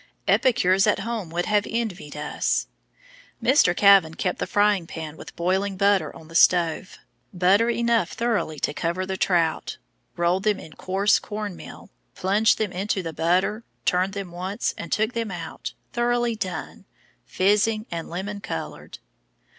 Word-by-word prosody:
Epicures 195 -6 +3
at 205 -2 +2
home 220 -4 -4
would 175 +2 -2
have 210 -1 +1
envied 200 -10 -4
us. 150 0 -1 0.7
Mr. 215 -10 +3
Kavan 195 -5 +6
kept 180 - -2
the - - -2
frying 205 -4 +2
pan 160 -2 -7
with - - -11
boiling 190 +3 0
butter 200 -1 +2
on 160 - -13
the 165 - -14
stove, 170 +1 +3 0.3
butter 195 +5 +3
enough 235 -5 +1
thoroughly 230 -9 -1
to - - 0
cover 170 +4 -2
the 190 0 -3
trout, 170 -4 0 0.4
rolled 175 +2 +2
them 210 -1 +1
in 155 - -11
coarse 195 +2 +1
corn 210 -2 -5
meal, - - -12 0.2
plunged 205 +4 +2
them 215 -3 -1
into 190 +1 -2
the 165 -1 -5
butter, 185 +7 +1 0.2
turned 185 +2 +1
them 200 -3 -5
once, 185 +3 -3
and 170 - -8
took 220 +3 +1
them 230 -2 -2
out, 170 -3 -6 0.2
thoroughly 240 -1 +1
done, 190 -4 -5 0.4
fizzing, 210 +3 +2
and 165 -1 -5
lemon 200 +4 -5
colored. 80 - -6
190 Hz, 155 wpm, -24 LUFS, 175-210 Hz, 0.7 s, Kavan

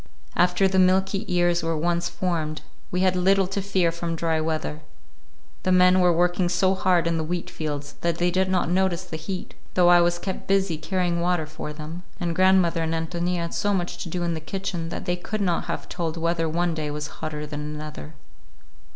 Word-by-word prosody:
After 180 +2 +3
the 190 0 +2
milky 190 +3 +3
ears 175 -1 +2
were 165 -1 -1
once 170 +2 0
formed, 160 -4 -2 0.3
we 180 - -1
had 185 -1 +3
little 190 +2 +3
to 195 +2 -3
fear 190 -3 +1
from 170 0 -3
dry 160 -1 0
weather. 155 -1 -2 0.8
The 185 - 0
men 180 0 +6
were 180 -1 +5
working 175 +1 +2
so 185 +2 +3
hard 185 -2 +2
in 170 0 +1
the - - -1
wheatfields 155 -3 -4
that 170 -1 0
they 175 +1 +2
did 185 +1 +1
not 185 -1 +1
notice 185 0 +1
the 170 - -7
heat,—though 180 0 -1
I 175 0 +7
was 175 0 +2
kept 190 +2 -5
busy 190 -5 +1
carrying 175 0 0
water 175 -2 +1
for 155 0 -7
them,—and 165 +3 -6
grandmother 185 -2 +4
and 160 0 -1
Ántonia 170 +2 -1
had 170 0 -4
so 205 -1 +1
much 175 -1 -3
to 175 - -5
do 175 +1 -2
in 170 -1 0
the 160 - -3
kitchen 175 +1 -4
that - - -5
they 175 - +1
could 195 +4 -4
not 180 -4 0
have - - -4
told 170 -2 -3
whether 165 0 0
one 170 +1 0
day 155 -2 -3
was 150 0 -4 0.2
hotter 150 -1 -4
than 150 0 -6
another. 150 +1 -7
175 Hz, 200 wpm, -25 LUFS, 160-185 Hz, 0.8 s, I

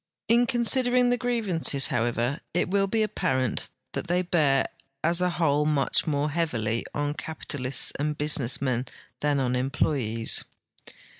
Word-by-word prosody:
In 240 +1 +4
consid 245 +1 +3
ering 245 0 +3
the - - +3
grievances, 210 - 0
however, 120 +4 -1 0.2
it 180 - 0
will 195 0 +2
be 220 +2 +1
ap})arent 130 - -1 0.2
that - - -4
they 180 +1 +1
bear 150 -6 +2 0.4
as 170 +2 +3
a 180 - +2
whole 155 -4 +1
much 150 0 +1
more 145 0 0
heavily 115 -9 -1
on 145 0 -1
capitalists 145 -4 -1
and 150 +1 -1
business 145 -4 +2
men 130 -2 -1 0.3
than 145 -1 +1
on 125 -2 0
em})loyes. 125 -3 0
150 Hz, 145 wpm, -26 LUFS, 130-180 Hz, 0.4 s, In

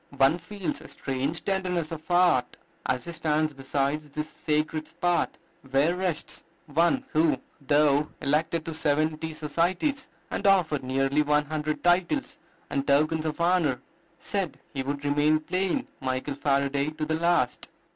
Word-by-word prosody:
One 135 +6 +4
feels 190 +2 -4
a - - -11
strange 135 +4 -3
tenderness 180 -4 -1
of 160 -1 -7
heart 175 -8 +3 0.3
as 130 0 -1
he 170 - -5
stands 155 -2 0
beside 140 +2 -1
this 150 +1 -5
sacred 155 0 -1
spot 175 -1 0 0.3
where 140 +6 +3
rests 180 -4 -3 0.2
one, 170 - +2
who, 160 +1 +3 0.3
though 145 0 +4
elected 155 +3 0
to 165 - -4
seventy 155 +1 0
societies, 175 - -1 0.2
and 200 - 0
offered 175 -7 +3
nearly 135 +3 +1
one 150 0 +2
hundred 155 0 -3
titles 180 - +1 0.3
and 140 -1 -2
tokens 155 +3 +2
of 155 +1 -4
honor, 170 -7 +2 0.4
said 195 -3 -3
he 135 - -2
"would 140 +2 -4
remain 150 +2 +3
plain 185 - -1
Michael 130 +1 -2
Faraday 140 0 +1
to 155 0 -4
the 160 - -1
last." 170 -8 +1
155 Hz, 145 wpm, -27 LUFS, 145-170 Hz, 0.4 s, One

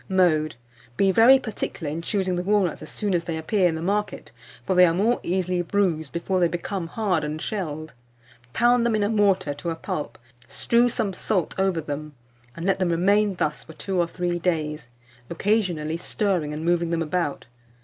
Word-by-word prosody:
Mode. 160 -5 +2 0.4
Be 195 -1 +4
very 230 +7 +7
particular 205 - -5
in 160 +2 -4
choosing 185 0 -1
the 175 - -1
walnuts 195 -2 +1
as 155 - -9
soon 205 -3 -2
as 170 -1 0
they 165 -2 -3
appear 180 +4 +2
in 160 - -2
the 160 - -5
market; 210 +3 -2 0.3
for 190 - +1
they 180 0 +7
are 165 - +1
more 225 +6 +2
easily 180 0 -1
bruised 170 -5 0
before 185 +2 -1
they 175 - +4
become 175 +1 -4
hard 185 -4 -1
and 150 +1 -3
shelled. 155 -6 -4 0.6
Pound 240 - +3
them 235 -2 +2
in 210 - +1
a 205 - +1
mortar 195 -8 +2
to 145 +4 -5
a 165 - -2
pulp, 150 -2 -5 0.3
strew 240 +1 +2
some 200 -4 -2
salt 185 -1 -1
over 190 -3 +1
them, 150 0 -6 0.4
and 170 - -6
let 195 0 +1
them 185 -2 +1
remain 200 +4 +2
thus 150 -3 -2
for 160 - -12
two 190 +2 -3
or 170 - +2
three 175 0 -2
days, 155 -5 -2 0.4
occasionally 170 -4 0
stirring 180 -4 -1
and 155 +2 -5
moving 170 -1 +1
them 165 -1 0
about. 165 -2 -2
180 Hz, 190 wpm, -24 LUFS, 160-200 Hz, 0.6 s, very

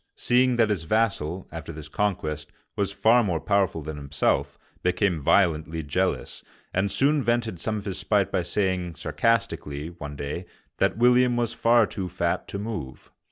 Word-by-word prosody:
seeing 125 +1 +3
that 115 -3 +3
his 100 -5 0
vassal, 95 -3 0
after - - -7
this 75 -1 -9
conquest, 75 -5 -2 0.2
was 100 -1 0
far 110 +4 +4
more 90 -6 0
powerful 95 -2 +1
than 80 0 -6
himself, 75 0 0 0.2
became 90 -1 +1
violently 80 0 +2
jealous, 70 - -2 0.3
and 95 +1 +1
soon 140 +9 +2
vented 120 -6 0
some 110 +4 -2
of 100 - -7
his 95 -2 -3
spite 100 -3 +1
by - - +1
saying 90 -1 -1
sarcastically, 80 -8 -1
one 75 -4 -8
day, 70 +6 -5 0.3
that - - +2
William 125 +1 +4
was 120 -1 0
far 115 -1 +4
too 95 -3 -5
fat 85 -1 -1
to - - -5
move. 100 - -6
95 Hz, 160 wpm, -25 LUFS, 80-110 Hz, 0.3 s, far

